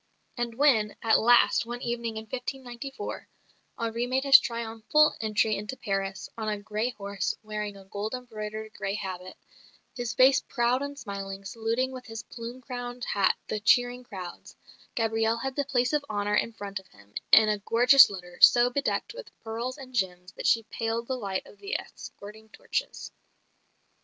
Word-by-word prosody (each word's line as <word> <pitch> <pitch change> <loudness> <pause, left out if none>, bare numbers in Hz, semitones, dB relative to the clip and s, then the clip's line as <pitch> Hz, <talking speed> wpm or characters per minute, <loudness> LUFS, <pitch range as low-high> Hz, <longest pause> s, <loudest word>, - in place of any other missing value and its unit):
And 240 -2 -3
when, 230 -6 +3
at 225 -1 +5
last, 240 0 +5
one 240 +1 -5
evening 235 -2 -3
in 220 - -5
1594, 260 - -6 0.5
Henri 230 +1 -2
made 260 +1 0
his 275 -2 +9
triumphal 230 +6 +1
entry 215 0 +1
into 210 +6 -5
Paris, 195 -1 -3
on 220 -1 -3
a 210 - -1
grey 215 +3 -2
horse, 200 -4 -3
wearing 210 -1 -4
a 195 - -14
gold 205 +4 -4
embroidered 220 -3 -6
grey 195 +1 -3
habit, 185 -3 -6 0.6
his 240 -3 -3
face 260 +2 +6
proud 245 0 0
and 285 0 -5
smiling, 195 -4 -6
saluting 230 +5 -1
with 255 -1 -9
his 225 -1 -6
plume 240 +2 -8
crowned 245 -1 -6
hat 200 -2 +2
the 215 - -2
cheering 245 +3 +3
crowds, 185 -7 -9 0.4
Gabrielle 225 0 +1
had 265 +2 -4
the 285 - 0
place 250 -1 +1
of 295 -1 +2
honour 205 -1 -1
in 220 - +2
front 200 -2 -5
of 190 - -19
him, 100 +1 -21 0.2
"in 220 -1 +8
a 210 -1 +1
gorgeous 245 +6 +7
litter, 180 -3 -9
so 240 +1 +7
bedecked 280 - -1
with - - -9
pearls 235 +4 -4
and 260 -2 -11
gems 180 -5 -2
that - - -4
she 225 - +4
paled 225 +1 -3
the 260 - -2
light 200 -6 -3
of - - -16
the 405 +2 -2
escorting 215 +2 -11
torches." - - -4
225 Hz, 170 wpm, -28 LUFS, 210-250 Hz, 0.6 s, his